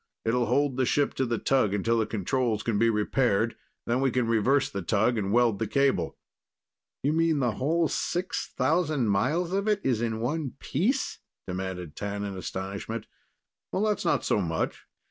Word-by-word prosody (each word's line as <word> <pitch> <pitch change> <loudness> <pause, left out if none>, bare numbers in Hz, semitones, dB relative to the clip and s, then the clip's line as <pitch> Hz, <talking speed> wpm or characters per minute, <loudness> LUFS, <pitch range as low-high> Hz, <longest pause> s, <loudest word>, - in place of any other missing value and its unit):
It'll 120 +1 +1
hold 140 -2 +1
the 130 - +2
ship 145 +3 +2
to 130 - -1
the 115 -1 0
tug 110 -7 +2
until 115 +3 +1
the 110 - 0
controls 110 +1 -1
can 110 -3 0
be 115 +1 +4
repaired, 115 +1 +1 0.3
then 120 +3 +1
we 135 - +3
can 125 0 +1
reverse 115 +5 +3
the 100 - -4
tug 110 +6 +2
and 100 -3 -1
weld 115 -3 +3
the 110 - -1
cable." 130 -7 +1 0.9
"You 145 +3 +2
mean 165 -1 +2
the 125 -4 +1
whole 160 +9 +1
6,000 155 -6 0
miles 150 - +1
of 200 +2 0
it's 195 - +1
in 110 -1 -1
one 140 +3 -2
piece?" 225 - -1 0.3
demanded 90 -3 -5
T'an 100 0 -3
in 100 -1 -5
astonishment. 100 +4 -5 0.7
"That's 210 +1 0
not - - +1
so 105 - +2
much. 80 -3 -2
120 Hz, 165 wpm, -27 LUFS, 105-145 Hz, 0.9 s, be